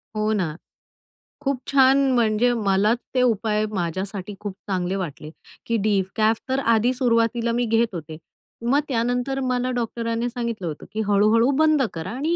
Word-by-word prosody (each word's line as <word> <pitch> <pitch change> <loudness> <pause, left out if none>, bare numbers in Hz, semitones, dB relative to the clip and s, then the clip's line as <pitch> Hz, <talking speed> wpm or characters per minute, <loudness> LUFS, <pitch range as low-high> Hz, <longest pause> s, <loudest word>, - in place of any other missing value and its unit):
हो 215 0 0
ना, 175 -7 -1 0.9
खूप 275 -2 -1
छान. 270 -1 +5 0.2
म्हणजे 230 +1 +3
मलाच 210 0 +2 0.2
ते 255 - +3
उपाय 215 -3 +1
माझ्यासाठी 190 +2 -4
खूप 205 -2 -5 0.2
चांगले 185 -1 -1
वाटले 155 -5 -5 0.4
की 230 - 0
डिकॅफ 215 +2 +1
तर 265 +1 +1 0.2
आधी 235 +3 +2
सुरुवातीला 235 -2 +1
मी 240 +1 0
घेत 230 +1 +2
होते. 160 -2 -7 0.5
मग 270 +4 +3
त्यानंतर 245 +2 -1
मला 255 0 0
डॉक्टरांनी 230 -1 -2
सांगितलं 235 -6 -4
होतं 155 -2 -6
की 220 - -2
हळू-हळू 215 +4 +4
बंद 310 -2 +4
करा 165 +3 -5
आणि 295 +8 -1
230 Hz, 150 wpm, -23 LUFS, 200-245 Hz, 0.9 s, छान